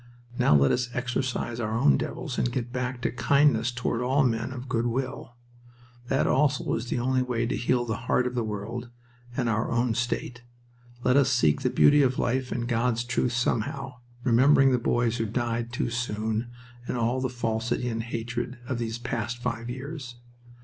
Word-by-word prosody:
Now 75 - +5
let 70 -1 +5
us 125 0 0
exorcise 125 -1 -2
our 110 -1 -1
own 70 - +5
devils - - -3
and 120 - +1
get 120 -1 -3
back 125 -1 -3
to - - +1
kindness 140 -3 +3
toward 120 -1 -2
all 135 +3 +2
men 115 -1 0
of 130 0 -7
good 120 -1 0
will. 130 0 -3 0.7
That 135 - +2
also 140 0 +2
is 115 +2 -2
the - - -1
only 130 +2 +1
way 120 -2 -1
to 115 - -1
heal 120 0 +1
the 115 -2 -2
heart 125 - +3
of 125 - -2
the 120 -2 0
world 110 +3 -5 0.5
and 125 -3 +1
our 110 -1 0
own 120 0 +1
state. 120 0 -2 0.6
Let 125 +2 +4
us 140 -2 +4
seek 100 - +3
the - - +1
beauty 145 0 +5
of 130 -2 +2
life 130 +1 0
and 120 0 -2
God's 120 0 +1
truth 125 0 0
somehow, 125 +3 -1 0.3
remembering 135 +2 +5
the 125 - +2
boys 120 0 +1
who 115 -2 -1
died 120 +1 -2
too 120 -1 -2
soon, 110 0 -2 0.4
and - - -2
all 120 +2 0
the 130 - 0
falsity 120 0 -1
and 115 -1 -2
hatred 120 +2 -4
of 125 - -2
these 115 -1 -2
past 120 -1 -3
five 120 -1 -3
years. 130 0 -6
120 Hz, 185 wpm, -27 LUFS, 115-125 Hz, 0.7 s, Now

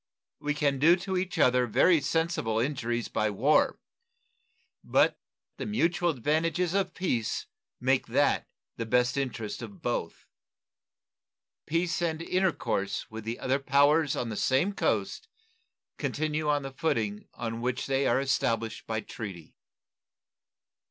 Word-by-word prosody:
We 150 0 -1
can 140 -3 +1
do 165 +5 +6
to 190 +1 -4
each 185 +1 -2
other 125 -4 +4
very 165 - +4
sensible 160 -10 0
injuries 120 -2 -1
by 110 0 0
war, 130 +10 +3 1.1
but - - +2 0.4
the - - -4
mutual 175 -4 +1
advantages 165 +5 0
of 195 -1 0
peace 120 - -1 0.3
make 130 +1 +1
that - - +2 0.3
the 115 - -3
best 125 +2 +2
interest 125 -6 -3
of 190 -5 -10
both. 120 - -3 1.4
Peace 170 +2 0
and 160 -2 0
intercourse 170 - -1
with 110 0 -7
the 115 +1 -3
other 135 +2 0
powers 145 +2 +3
on 120 - -2
the 110 - -4
same 135 +10 +2
coast 445 - -1 0.7
continue 155 0 -1
on 145 -1 +1
the 135 - -5
footing 110 -9 -1
on 115 -1 -4
which 125 +2 -1
they 135 0 +1
are - - +3
established 115 -5 -1
by 110 -1 -1
treaty. 95 -6 -8
140 Hz, 130 wpm, -28 LUFS, 115-165 Hz, 1.4 s, do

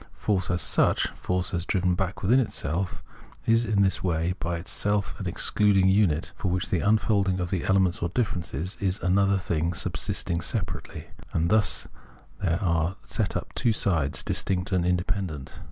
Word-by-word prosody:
Force 95 -3 -1
as 90 -1 0
such, - - +2
force 90 +1 -2
as 85 -1 0
driven 90 0 +1
back 95 +3 -3
within 120 +8 +4
itself, 90 - -2 0.4
is 115 +1 +3
in 100 -2 +2
this 95 - +1
way 85 -1 0
by 85 0 -2
itself 100 +4 -1
an - - -3
excluding 100 -2 +3
unit, 90 -5 +2
for 85 - -3
which 90 0 -2
the 90 - +2
unfolding 100 -2 +2
of 90 -1 -3
the 95 - -1
elements 95 0 +2
or 85 - 0
differences 90 - -2
is 95 -1 -1
another 100 +2 +3
thing 85 -2 -1
subsisting 85 -1 -1
separately; - - -5 0.2
and 85 +2 +1
thus 85 -12 +2 0.5
there 85 -3 +1
are 85 0 +1
set - - -1
up - - -7
two 120 - +2
sides, 85 -10 +1
distinct 95 0 -1
and 90 -2 +1
independent. 90 -5 -2
90 Hz, 165 wpm, -26 LUFS, 85-100 Hz, 0.5 s, within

